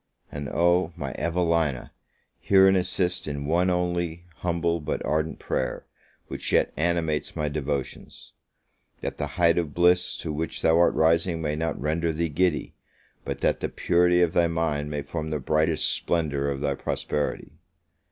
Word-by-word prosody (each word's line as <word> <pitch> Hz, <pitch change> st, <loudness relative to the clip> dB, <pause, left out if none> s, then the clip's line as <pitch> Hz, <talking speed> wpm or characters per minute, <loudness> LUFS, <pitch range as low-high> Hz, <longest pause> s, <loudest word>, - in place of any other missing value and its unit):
And 70 Hz, -1 st, -5 dB
oh, 85 Hz, 0 st, +2 dB
my 70 Hz, -2 st, -4 dB
Evelina, 85 Hz, -6 st, 0 dB, 0.5 s
hear 95 Hz, -1 st, +5 dB
and 95 Hz, -, +5 dB
assist 90 Hz, -1 st, 0 dB
in 70 Hz, -1 st, -4 dB
one 85 Hz, +5 st, +2 dB
only, 85 Hz, -1 st, -1 dB
humble, 85 Hz, -1 st, 0 dB
but 75 Hz, -, -3 dB
ardent 80 Hz, +1 st, -1 dB
prayer, -, -, -3 dB, 0.4 s
which -, -, -5 dB
yet -, -, +2 dB
animates 80 Hz, -2 st, -1 dB
my 75 Hz, -, -1 dB
devotions: 70 Hz, -2 st, -5 dB, 0.7 s
That -, -, -5 dB
the -, -, -1 dB
height 85 Hz, -1 st, +4 dB
of 75 Hz, -4 st, -4 dB
bliss 90 Hz, +1 st, +3 dB
to 80 Hz, -, -4 dB
which 80 Hz, +1 st, -3 dB
thou 80 Hz, +1 st, +4 dB
art 85 Hz, -, +4 dB
rising 80 Hz, +1 st, +2 dB
may 75 Hz, -2 st, -2 dB
not 80 Hz, +1 st, -2 dB
render 80 Hz, +3 st, 0 dB
thee 80 Hz, +1 st, -1 dB
giddy, 80 Hz, 0 st, 0 dB, 0.5 s
but -, -, -4 dB
that -, -, +1 dB
the -, -, -2 dB
purity 90 Hz, 0 st, +3 dB
of 85 Hz, -1 st, +1 dB
thy 85 Hz, -2 st, +3 dB
mind 80 Hz, -3 st, -1 dB
may 75 Hz, -1 st, -3 dB
form 80 Hz, +2 st, -4 dB
the 75 Hz, -, -1 dB
brightest 80 Hz, +3 st, +1 dB
splendour 75 Hz, -4 st, -1 dB
of 70 Hz, -1 st, -3 dB
thy 70 Hz, -1 st, 0 dB
prosperity! 75 Hz, +1 st, -3 dB
80 Hz, 160 wpm, -26 LUFS, 75-85 Hz, 0.7 s, hear